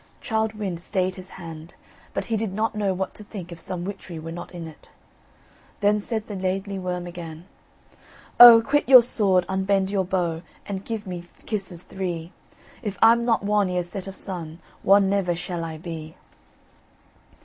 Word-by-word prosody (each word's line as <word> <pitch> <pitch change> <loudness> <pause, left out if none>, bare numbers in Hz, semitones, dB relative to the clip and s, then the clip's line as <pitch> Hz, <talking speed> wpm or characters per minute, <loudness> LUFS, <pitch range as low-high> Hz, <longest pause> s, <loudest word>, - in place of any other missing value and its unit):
Childe 220 -2 -1
Wynd 195 -6 -4
stayed 185 +1 -1
his 185 0 -11
hand, 165 -2 -10 0.4
but - - -1
he 230 - -1
did 220 -2 -1
not 220 +3 0
know 205 -2 0
what 190 0 -3
to 210 - -11
think 190 -4 -8
if 170 - -8
some 180 0 -5
witchery 190 -3 -7
were 160 +1 -7
not 175 +1 -7
in 170 -2 -7
it. 160 - -15 0.9
Then 210 0 +3
said 220 +1 -3
the 210 - -7
Laidly 190 +1 -2
Worm 180 -1 -3
again: 170 -2 -8 0.9
"O, 235 -2 +11
quit 290 +2 +1
your 255 -3 +10
sword, 195 -6 +2
unbend 190 0 +1
your 195 -2 +1
bow, 175 -3 -1 0.2
And 195 -1 -5
give 225 -1 -4
me 175 -2 -6 0.2
kisses 190 -5 -4
three, 175 -3 -4 0.5
If 205 -5 -4
I'm 235 +1 +6
not 230 -4 +2
won 205 -1 +2
ere 180 -1 0
set 185 +2 -7
of 195 - -7
sun, 170 -5 -6 0.3
Won 195 0 +6
never 190 -3 +1
shall 175 -1 -4
I 160 -1 -5
be." 160 -1 -7
190 Hz, 175 wpm, -24 LUFS, 175-210 Hz, 0.9 s, O